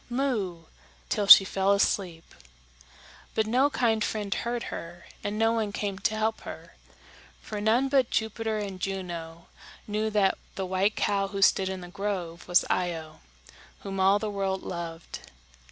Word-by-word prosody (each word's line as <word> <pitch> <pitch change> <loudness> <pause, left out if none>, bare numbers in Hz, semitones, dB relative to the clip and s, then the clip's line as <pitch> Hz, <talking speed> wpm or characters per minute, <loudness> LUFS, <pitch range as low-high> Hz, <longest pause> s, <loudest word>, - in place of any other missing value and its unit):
moo!" 225 -10 -1 0.5
till 205 -2 0
she 195 - +11
fell 195 +1 +2
asleep. 185 -4 -1 1.0
But 220 - +2
no 255 +6 +3
kind 225 -6 +1
friend 205 -3 -2
heard 235 0 -3
her, 170 +1 -8 0.2
and 205 0 -3
no 225 +1 +3
one 220 -3 -1
came 200 -1 -3
to 215 +2 0
help 220 +1 -1
her; - - -10 0.7
for 210 -1 -6
none 230 +5 +3
but 270 -3 +2
Jupiter 220 0 -1
and 200 -3 -5
Juno 175 -3 -5 0.4
knew 215 +1 -1
that 205 -3 +2 0.2
the 190 - -3
white 190 +3 +1
cow 200 -1 +1
who 195 0 -1
stood 190 0 +4
in 190 -1 -5
the 175 - -8
grove 185 -3 -4
was 175 0 +4
Io, 165 -3 -2 0.6
whom 195 -1 -5
all 190 +2 +5
the 215 - -3
world 195 -1 -2
loved. 170 -1 -6
200 Hz, 155 wpm, -27 LUFS, 185-220 Hz, 1.0 s, she